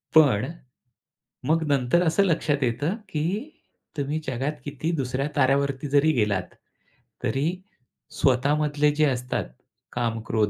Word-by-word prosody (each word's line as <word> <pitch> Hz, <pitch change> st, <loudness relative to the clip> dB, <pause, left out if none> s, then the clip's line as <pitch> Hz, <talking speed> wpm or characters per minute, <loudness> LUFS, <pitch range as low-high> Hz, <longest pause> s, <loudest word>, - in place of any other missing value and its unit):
पण 135 Hz, -3 st, +5 dB, 1.0 s
मग 160 Hz, +1 st, +3 dB
नंतर 140 Hz, +4 st, +2 dB
असं 165 Hz, +5 st, +3 dB
लक्षात 150 Hz, -5 st, +1 dB
येतं 145 Hz, -, 0 dB
की 150 Hz, -4 st, -2 dB, 0.7 s
तुम्ही 145 Hz, +2 st, -1 dB
जगात 130 Hz, +4 st, -1 dB
किती 145 Hz, +3 st, -2 dB
दुसऱ्या 135 Hz, +1 st, -1 dB
ताऱ्यावरती 140 Hz, +1 st, +2 dB
जरी 145 Hz, +3 st, +4 dB
गेलात 105 Hz, -7 st, 0 dB, 0.7 s
तरी 135 Hz, +3 st, 0 dB, 0.7 s
स्वतःमधले 145 Hz, +3 st, +3 dB
जे 155 Hz, 0 st, +4 dB
असतात 125 Hz, -2 st, -1 dB, 0.5 s
काम, 115 Hz, -2 st, -1 dB
क्रोध 110 Hz, -2 st, +2 dB
140 Hz, 115 wpm, -25 LUFS, 125-150 Hz, 1.0 s, पण